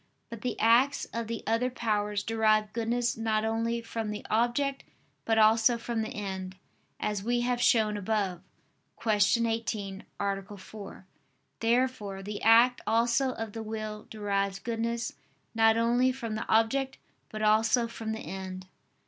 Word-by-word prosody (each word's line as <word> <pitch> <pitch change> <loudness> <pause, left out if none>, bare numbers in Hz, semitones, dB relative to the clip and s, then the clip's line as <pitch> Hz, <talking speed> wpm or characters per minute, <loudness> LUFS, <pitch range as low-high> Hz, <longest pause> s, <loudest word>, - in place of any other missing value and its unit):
But 230 -2 -7
the 250 - -3
acts 240 +6 +4
of 230 -1 -3
the 230 -1 -4
other 230 +3 +1
powers 210 -4 -1
derive 215 -2 +2
goodness 240 +1 0
not 220 -1 0
only 230 +1 -1
from 225 -1 -4
the 210 0 -5
object 245 +5 +1 0.4
but 225 -1 +2
also 225 +2 +5
from 230 -1 -3
the 220 - -3
end, 190 -2 -5 0.4
as 210 -2 -2
we 240 +2 +1
have 245 0 0
shown 215 -3 +3
above 200 -3 -1 0.6
(Q. 220 +1 +3
18, 215 -4 -3 0.2
A. 200 0 -3
4). 200 -1 -10 0.5
Therefore 230 -5 0
the 205 +1 -5
act 235 +2 +5
also 235 +3 +2
of 225 -3 -6
the 225 - -5
will 215 -1 -5
derives 200 -2 -1
goodness 230 +2 -2 0.4
not 225 0 +4
only 240 +3 +3
from 240 -4 -5
the 215 - -4
object 260 +5 +2 0.3
but 215 0 -5
also 225 +3 +3
from 225 -1 -5
the 220 - -4
end. 185 -1 -6
225 Hz, 150 wpm, -29 LUFS, 210-235 Hz, 0.6 s, also